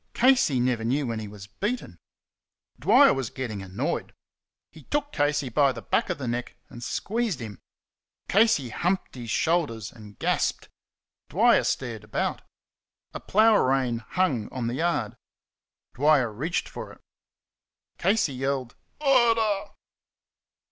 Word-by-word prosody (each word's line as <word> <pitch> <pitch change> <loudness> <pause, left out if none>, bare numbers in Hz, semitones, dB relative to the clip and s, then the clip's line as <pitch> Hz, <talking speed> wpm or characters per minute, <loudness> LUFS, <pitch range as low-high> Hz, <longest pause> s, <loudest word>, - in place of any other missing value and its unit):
Casey 245 - +4
never 120 -2 0
knew 135 +5 0
when 115 -2 -3
he 110 - -6
was 100 -1 -10
beaten. 195 - -4 0.8
Dwyer - - +6
was 135 -4 -3
getting 115 -6 -5
annoyed. 95 0 -3 0.6
He 155 -3 -15
took 290 0 -2
Casey 145 -2 +1
by 140 +3 +3
the - - -9
back - - 0
of - - -1
the 135 -3 -5
neck 120 +1 -3 0.2
and 120 - -10
squeezed 220 - -2
him. 110 -4 -8 0.7
Casey 200 - +3
humped 180 - -1
his 120 -3 -8
shoulders 140 - 0
and 105 -3 -14
gasped. - - -1 0.6
Dwyer - - +4
stared 115 -5 -2
about. 105 - -2 0.7
A - - -5
plough 215 +1 +4
rein 130 -5 +1
hung 130 - -1
on 125 -2 -3
the 120 - -2
yard. 130 -7 -1 0.8
Dwyer 140 -4 +3
reached 160 +11 -2
for - - -8
it. - - -19 1.0
Casey 195 -8 +2
yelled, 130 -1 -2 0.2
"Murder!" 230 -7 +3
135 Hz, 135 wpm, -26 LUFS, 115-185 Hz, 1.0 s, Dwyer